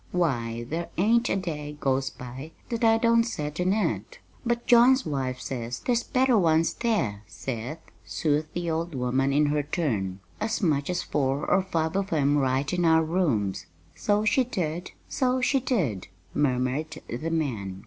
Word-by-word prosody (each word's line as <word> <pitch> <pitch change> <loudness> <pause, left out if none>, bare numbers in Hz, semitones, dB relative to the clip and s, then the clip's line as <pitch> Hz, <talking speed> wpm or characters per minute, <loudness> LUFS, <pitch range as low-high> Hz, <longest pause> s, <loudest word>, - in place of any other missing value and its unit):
Why, 120 -9 -1
there 165 +5 -3
ain't 230 +6 +3
a - - +1
day 150 -6 -4
goes 135 0 +1
by 130 +6 -9 0.2
that 235 -1 -2
I 225 0 +5
don't 230 0 +4
set 150 -9 -4
in 180 +1 +2
it!" 220 - -1 0.3
"But 240 -1 -1
John's 250 +2 +6
wife 130 -4 -2
says 125 -1 -5
there's 240 -2 +1
better 255 -2 +2
ones 165 -2 +3
there, 205 - -1
Seth," 120 +7 -5 0.3
soothed 150 0 -1
the 175 0 -2
old 165 0 -2
woman 130 +2 +1
in 145 +2 +3
her 150 0 +1
turn, 115 - -2 0.2
"as 220 +1 -1
much 150 -6 +1
as 180 - -1
four 135 0 -1
or 195 - +4
five 165 -3 -1
of 195 0 -1
'em 145 -2 +3
right 135 +2 0
in 180 -1 +1
our 160 -1 +5
rooms." 150 - 0 0.3
"So 210 0 +1
she 260 +5 +4
did, 175 -7 -3 0.2
so 255 0 +1
she 265 +2 +2
did!" 165 - -1 0.3
murmured 145 +2 0
the 125 +8 -3
man. 115 - -2
155 Hz, 170 wpm, -26 LUFS, 130-200 Hz, 0.3 s, John's